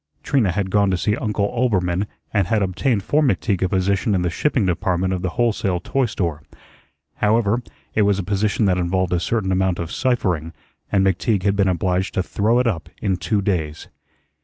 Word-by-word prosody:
Trina 125 -10 +2
had 95 +1 -2
gone 100 0 +3
to 95 - +1
see 105 +3 0
Uncle 105 -4 -1
Oelbermann 100 -6 0 0.3
and 100 -4 +2
had 110 0 +1
obtained 100 +4 0
for 150 +9 +2
McTeague 100 - +1
a 95 - +1
position 100 +2 +1
in 90 - 0
the 90 - 0
shipping 130 - +1
department 90 +1 0
of 90 - -2
the 90 - -1
wholesale 105 -6 +1
toy 130 +8 0
store. 85 -9 -3 0.8
However, 110 +2 +2 0.3
it 110 - +2
was 100 -1 +3
a 100 - -2
position 105 +3 0
that 90 -2 +2
involved 90 0 0
a 90 - +2
certain 95 +2 -1
amount 95 -1 +1
of 85 0 -5
ciphering, 90 - 0 0.4
and 95 -1 +3
McTeague 95 +1 +1
had 100 0 +2
been 100 -1 +2
obliged 90 +1 0
to 95 - +1
throw 110 +6 +1
it 125 - +2
up 85 -10 -2
in 95 - 0
two 100 +4 -1
days. 80 -6 -2
95 Hz, 195 wpm, -21 LUFS, 90-105 Hz, 0.8 s, gone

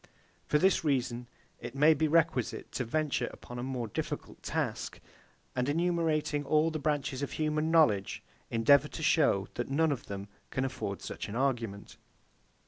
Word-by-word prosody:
For 150 - +3
this 190 +3 +3
reason 125 -5 0 0.3
it - - -7
may 150 +3 +6
be 155 +1 +1
requisite 155 -6 +1
to 125 - -2
venture 135 0 0
upon 120 0 -9
a - - -3
more 130 -3 -3
difficult 105 - -5
task; - - -3 0.6
and 125 +2 0
enumerating 160 -2 +1
all 155 +3 +2
the 155 - -3
branches 140 -2 -1
of 140 - -3
human 155 0 0
knowledge, 130 -13 +3 0.3
endeavour 140 +6 +5
to 155 - -7
show 140 - +3
that 120 - -3
none 160 +3 +2
of 135 - -4
them 100 0 -6 0.2
can 130 - -1
afford 100 -7 -4
such - - -5
an 105 - -5
argument. 120 -6 -2
140 Hz, 160 wpm, -31 LUFS, 120-155 Hz, 0.6 s, may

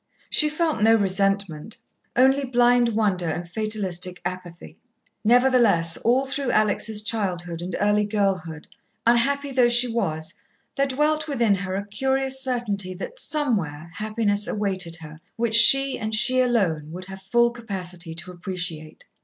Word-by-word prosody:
She 305 - +4
felt 310 -5 -1
no 225 +1 +5
resentment, 195 -3 -1 0.4
only 265 +3 +3
blind 245 -1 +2
wonder 205 -6 -1
and 175 +2 -5
fatalistic 185 -3 -2
apathy. 180 -2 -8 0.4
Nevertheless, 235 -8 +3
all 255 +4 +1
through 275 -1 -2
Alex' 215 0 0
childhood 175 -6 -2
and 180 0 -5
early 205 0 +1
girlhood, 190 -7 -2 0.4
unhappy 275 +4 +1
though 250 -2 +3
she 240 +1 +5
was, 170 -9 -2 0.4
there 275 0 +1
dwelt 305 +3 0
within 235 -8 +1
her 190 -1 -3
a 200 +1 -4
curious 265 +5 -1
certainty 205 -7 -2
that, 475 - -8
somewhere, 180 - -2
happiness 210 0 0
awaited 190 -5 -2
her, 155 -1 -11
which 235 -1 -2
she, 270 +4 +7
and 215 0 -1
she 255 +3 +3
alone, 180 -12 -1
would 180 +2 -8
have 190 0 -10
full 235 +5 +1
capacity 180 -7 -7
to 170 +3 -7
appreciate. 175 -3 -6
210 Hz, 140 wpm, -23 LUFS, 180-245 Hz, 0.4 s, she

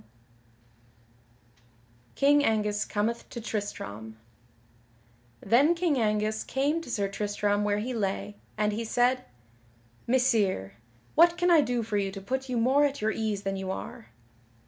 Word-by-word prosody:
[Sidenote: 115 0 -33 0.5
King 290 +1 +4
Angus 210 -3 +1
cometh 225 +3 -2
to 235 - -7
Tristram] 110 - -5 1.2
Then 270 +11 +4
King 335 -6 +1
Angus 215 0 0
came 290 +5 0
to 325 - -11
Sir 200 -4 -1
Tristram 205 0 -1
where 205 0 +1
he 235 +5 -3
lay, 205 -1 -2 0.2
and 210 0 +1
he 225 +2 -3
said: 245 +3 +1 0.8
"Messire 220 - +1 0.4
what 340 +2 +5
can 355 0 +2
I 330 -3 +7
do 245 -4 -1
for 215 -1 -2
you 195 -1 -1
to 195 - -6
put 265 +6 -4
you 250 - -1
more 260 +5 +3
at 285 -1 0
your 215 +1 0
ease 215 -2 -2
than 195 -1 -2
you 190 0 -5
are?" 225 +4 -6
210 Hz, 145 wpm, -28 LUFS, 195-250 Hz, 1.2 s, I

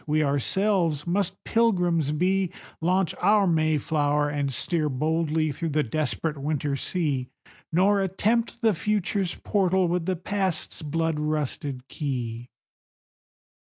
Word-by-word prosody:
we 155 +1 +2
ourselves 160 - +1
must 190 +1 -1
Pilgrims 180 -10 +2
be, 185 +4 +1 0.3
Launch 180 +1 +1
our 205 +2 +4
Mayflower, 150 -3 +1
and 145 -2 -1
steer 155 +4 0
boldly 155 +2 0
through 165 +4 -3
the 150 0 +1
desperate 155 +3 -2
winter 145 0 -1
sea, 140 -4 -1 0.4
Nor 195 +4 +3
attempt 225 +5 0
the 220 -2 +4
Future's 195 0 -1
portal 190 -3 +1
with 175 -1 -1
the 185 - +1
Past's 190 0 -2
blood 160 +1 -1
rusted 145 -3 -2
key. 120 -4 -4
160 Hz, 115 wpm, -26 LUFS, 150-190 Hz, 0.4 s, our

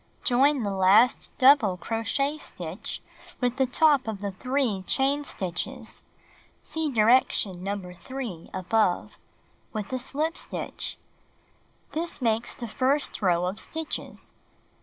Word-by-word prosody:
Join 270 +1 +4
the 200 - -1
last 195 +6 +4
double 255 -8 +6
crochet 255 - -1
stitch 175 - -5 0.4
with 250 0 0
the 265 -1 +3
top 280 0 +4
of 215 -3 -3
the 200 0 -3
3 250 0 -1
chain 280 +2 +2
stitches 180 -10 -5 0.6
(see 320 -1 -1
direction 215 -6 +3
number 195 -2 -4
3, 225 -4 -7
above) 190 0 +1 0.6
with 215 +2 -4
a 255 - 0
slip 305 +6 -2
stitch. - - -4 0.9
This 335 +2 -2
makes 230 -2 +1
the 235 - -6
first 265 +5 0
row 180 -3 +2
of 190 +4 -3
stitches. 320 -1 -5
235 Hz, 120 wpm, -27 LUFS, 195-275 Hz, 0.9 s, double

